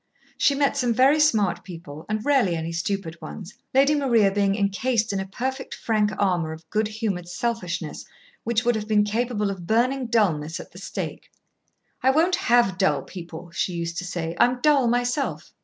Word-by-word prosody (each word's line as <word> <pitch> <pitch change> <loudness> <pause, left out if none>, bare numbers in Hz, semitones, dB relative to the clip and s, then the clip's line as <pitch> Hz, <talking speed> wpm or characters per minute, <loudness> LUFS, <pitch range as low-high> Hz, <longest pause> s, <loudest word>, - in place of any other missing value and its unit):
She 280 - +3
met 280 0 +2
some 245 -4 +1
very 275 +5 +5
smart 210 - +2
people 165 -4 -10
and 215 0 -2
rarely 265 -12 +3
any 165 0 -3
stupid 170 -1 -3
ones, 205 -2 -8 0.2
Lady 275 +3 +4
Maria 235 -9 +3
being 200 0 +1
incased 215 +2 0
in 195 - -1
a 190 - -4
perfect, 260 +6 -4
frank 215 -2 +1
armour 175 -5 +1
of 160 +1 -12
good 215 0 +1
humoured 210 -5 -3
selfishness, 180 -5 -3 0.4
which 235 0 0
would 240 - +4
have 215 -1 -3
been 210 -1 +4
capable 210 -1 -1
of 180 -3 -8
burning 250 +3 +1
dulness 170 -9 +1
at - - -10
the - - -12
stake. - - -6 0.7
"I 260 - +4
won't 325 +6 +3
have 240 - +2
dull 190 - +2
people," 170 -1 -9
she 180 +1 -1
used 170 -1 -3
to - - -5
say. 175 -2 -4
"I'm 250 +1 +4
dull 285 -4 +4
myself." 245 +4 -1
210 Hz, 180 wpm, -24 LUFS, 180-245 Hz, 0.7 s, very